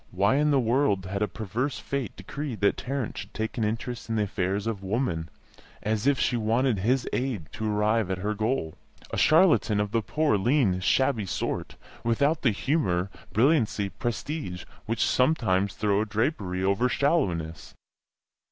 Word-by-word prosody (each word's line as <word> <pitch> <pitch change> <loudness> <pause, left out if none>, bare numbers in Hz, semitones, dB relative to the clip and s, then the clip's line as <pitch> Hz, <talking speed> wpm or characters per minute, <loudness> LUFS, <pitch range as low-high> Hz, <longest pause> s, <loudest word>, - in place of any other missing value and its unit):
Why 100 +7 +2
in 150 +1 +3
the 140 -2 +4
world 115 -5 +1
had 100 +2 -3
a 105 - +2
perverse 110 +8 -3
fate 140 -6 -4
decreed 120 +2 -6
that 100 - +3
Tarrant 135 -3 -3
should 100 - -9
take 110 +2 -3
an - - +1
interest 115 +3 -3
in 115 - 0
the 105 - +2
affairs 100 +1 -1
of 110 -4 -2
Woman 95 -6 -1 0.5
as 110 +3 0
if 140 -2 +3
she 125 - +1
wanted 115 0 +1
his 125 +6 +1
aid 120 - -2
to 110 -1 -2
arrive 105 0 +1
at 95 - -1
her 105 +3 -2
goal; 110 -6 -1 0.4
a - - -3
charlatan 155 - +4
of 105 -1 -1
the 115 - +1
poor, 145 -1 +1
lean, 115 -5 +2
shabby 110 +1 +1
sort, - - -3 0.3
without 140 +7 +2
the 130 - +4
humour, 100 - 0 0.2
brilliancy, 115 -5 +2
prestige, 115 - -4 0.2
which 115 0 +1
sometimes 100 - +2
throw 105 -1 +1
a - - 0
drapery 105 - -1
over 100 +6 +2
shallowness? 90 - 0
110 Hz, 165 wpm, -27 LUFS, 100-130 Hz, 0.5 s, the